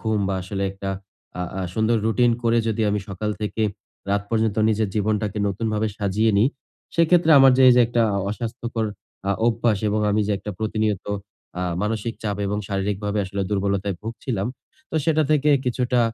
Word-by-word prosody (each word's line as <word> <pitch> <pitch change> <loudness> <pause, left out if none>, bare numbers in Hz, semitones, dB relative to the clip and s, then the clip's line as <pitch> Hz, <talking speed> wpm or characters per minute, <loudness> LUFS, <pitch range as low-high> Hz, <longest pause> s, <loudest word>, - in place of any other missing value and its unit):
ঘুম 110 -2 0
বা 95 - 0
আসলে 100 +1 -4
একটা 95 0 -5 0.5
আ - - 0 0.2
আ - - -1
সুন্দর 110 +1 +2
রুটিন 120 +2 +3
করে, 115 0 +3
যদি 110 0 0
আমি 105 - 0
সকাল 105 +2 -3
থেকে 110 +1 -2 0.5
রাত 100 0 +1
পর্যন্ত 110 -2 +1
নিজের 110 -1 +1
জীবনটাকে 105 0 0
নতুনভাবে 110 +2 -1
সাজিয়ে 105 +2 +1
নিই। 115 +6 +4 0.5
সেক্ষেত্রে 165 0 +4
আমার 135 -1 +7
যে 130 - +5
এই - - +8
যে 125 - +7
একটা 120 0 +1 0.3
অস্বাস্থ্যকর 115 0 -3 0.4
আ - - +3 0.2
অভ্যাস 115 -2 +2
এবং 105 +1 0
আমি 105 +1 +2
যে 105 - +2 0.3
প্রতিনিয়ত 110 -2 -1 0.5
আ - - -1 0.2
মানসিক 110 +1 -2
চাপ 105 -2 -2
এবং 105 +1 -1
শারীরিকভাবে 100 +1 -1
আসলে 100 +1 -3
দুর্বলতায় 100 -1 0
ভুগছিলাম। 115 -2 -3 0.4
তো - - -9
সেটা 155 -1 +3
থেকে 150 0 +3
কিছুটা 125 0 +1
110 Hz, 165 wpm, -23 LUFS, 100-115 Hz, 0.5 s, এই